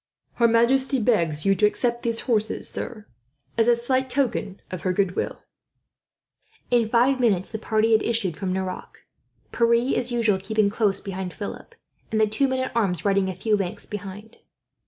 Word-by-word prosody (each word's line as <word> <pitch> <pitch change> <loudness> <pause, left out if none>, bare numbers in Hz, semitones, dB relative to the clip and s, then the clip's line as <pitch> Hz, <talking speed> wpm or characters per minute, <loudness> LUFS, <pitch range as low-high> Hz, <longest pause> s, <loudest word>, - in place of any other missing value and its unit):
"Her 235 - +5
majesty 260 +4 +3
begs 170 -10 +1
you 195 - +4
to 210 +2 +4
accept 235 +2 -1
these 230 -1 -1
horses, 220 -4 0
sir, 215 -4 -4 0.5
as 225 0 +2
a 240 - +5
slight 260 +2 -1
token 250 -7 -1
of 185 -3 -5
her 180 +3 0
goodwill." 190 -1 -2 1.3
In 235 -3 +3
five 250 +3 +3
minutes, 200 -7 +1
the 220 - -4
party 220 +1 +1
had 220 -1 +5
issued 220 -8 -1
from 190 0 -3
Nerac; 185 0 -5 0.5
Pierre, 235 +2 +2
as 245 0 0
usual, 225 -5 +1
keeping 205 +1 +1
close 205 -2 0
behind 190 -2 -6
Philip, 205 - -7 0.4
and 220 - +1
the 215 - +5
two 215 +6 +2
men 260 0 -1
at 260 - -4
arms 190 -7 0
riding 195 -1 +2
a 185 - -5
few 210 +4 +1
lengths 195 -3 -4
behind. 205 +2 -8
220 Hz, 175 wpm, -24 LUFS, 195-235 Hz, 1.3 s, Her